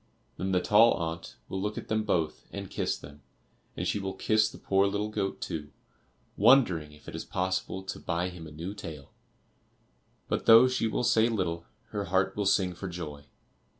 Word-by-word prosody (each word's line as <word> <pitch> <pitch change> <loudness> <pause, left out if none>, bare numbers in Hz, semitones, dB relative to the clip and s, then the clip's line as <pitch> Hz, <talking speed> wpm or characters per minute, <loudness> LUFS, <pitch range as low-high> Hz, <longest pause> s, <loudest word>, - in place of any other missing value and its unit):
Then 95 +1 -2
the 90 - +3
tall 105 +5 +6
aunt 85 0 -5
will 95 - -4
look 105 +1 -2
at - - -6
them 110 0 0
both 80 -6 -1
and - - -7
kiss - - -1
them; 75 0 -13 0.6
and - - -1
she - - 0
will 95 -1 -4
kiss 110 +2 +2
the - - -12
poor 95 0 +2
little 105 +1 -1
goat 100 -2 -2
too, 75 -2 -4 0.7
wondering 100 - +4
if 75 0 -18
it - - -7
is - - -4
possible 95 +1 -2
to - - -6
buy 85 +1 -1
him 90 -3 -9
a - - -11
new 85 +6 -6
tail. 80 -8 -9 1.1
But - - -2
though 115 +3 +9
she 130 -3 0
will 110 - -1
say 120 -1 +4
little, 85 -6 -2 0.2
her 100 -1 -3
heart 95 +2 +1
will 105 -2 0
sing 95 -2 +2
for 95 +3 -6
joy. 75 -5 -7
95 Hz, 190 wpm, -29 LUFS, 85-105 Hz, 1.1 s, though